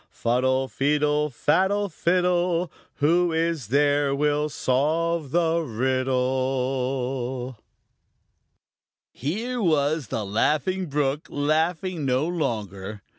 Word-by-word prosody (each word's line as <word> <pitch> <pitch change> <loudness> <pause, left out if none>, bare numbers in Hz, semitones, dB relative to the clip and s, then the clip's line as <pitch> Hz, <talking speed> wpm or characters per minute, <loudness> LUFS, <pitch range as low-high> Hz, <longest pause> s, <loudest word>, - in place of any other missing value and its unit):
Fuddle, 130 +2 0
feedle, 150 +2 +1
faddle, 190 - +1
fiddle! 180 0 +1 0.2
Who 170 +4 +2
is 165 -6 -1
there 145 +2 +2
will 150 +1 +1
solve 155 +4 0
the 165 +2 +2
riddle? 130 -1 -1 1.5
Here 230 - -3
was 155 - +1
the 105 +1 -3
Laughing 155 - 0
Brook 145 0 -1
laughing 160 +3 0
no 130 +2 +1
longer. 105 - -3
145 Hz, 85 wpm, -24 LUFS, 130-165 Hz, 1.5 s, Who